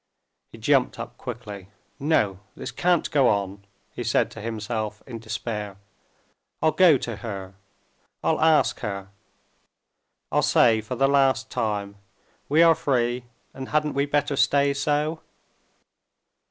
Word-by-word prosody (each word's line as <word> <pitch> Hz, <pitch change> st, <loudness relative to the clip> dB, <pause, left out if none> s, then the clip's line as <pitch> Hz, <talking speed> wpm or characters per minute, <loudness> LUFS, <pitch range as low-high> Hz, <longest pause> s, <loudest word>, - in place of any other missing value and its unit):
He -, -, -12 dB
jumped -, -, +2 dB
up -, -, -7 dB
quickly. 100 Hz, -3 st, -8 dB, 0.3 s
"No, 110 Hz, -, +1 dB, 0.2 s
this -, -, -6 dB
can't 175 Hz, -2 st, +1 dB
go 140 Hz, -4 st, +4 dB
on!" 100 Hz, -1 st, -1 dB, 0.3 s
he 120 Hz, -, -5 dB
said 120 Hz, -, +1 dB
to 115 Hz, -, -9 dB
himself 110 Hz, -1 st, -4 dB
in 120 Hz, -4 st, -7 dB
despair. 105 Hz, -2 st, -5 dB, 0.8 s
"I'll 160 Hz, -, +3 dB
go 160 Hz, -2 st, +6 dB
to 115 Hz, -4 st, -5 dB
her; 100 Hz, -4 st, -7 dB, 0.7 s
I'll 160 Hz, -, +1 dB
ask 160 Hz, -1 st, +3 dB
her; 100 Hz, -3 st, -5 dB, 1.2 s
I'll -, -, +3 dB
say 110 Hz, -2 st, +4 dB
for 110 Hz, -, -5 dB
the 135 Hz, -, +3 dB
last 135 Hz, -1 st, +2 dB
time: 100 Hz, -2 st, -2 dB, 0.5 s
we 155 Hz, +4 st, +5 dB
are 165 Hz, -1 st, +7 dB
free, 125 Hz, -4 st, 0 dB, 0.3 s
and 130 Hz, 0 st, -7 dB
hadn't 150 Hz, 0 st, +1 dB
we 140 Hz, +1 st, 0 dB
better 145 Hz, 0 st, 0 dB
stay 140 Hz, +1 st, +3 dB
so? 150 Hz, +3 st, -1 dB
120 Hz, 135 wpm, -24 LUFS, 105-145 Hz, 1.2 s, are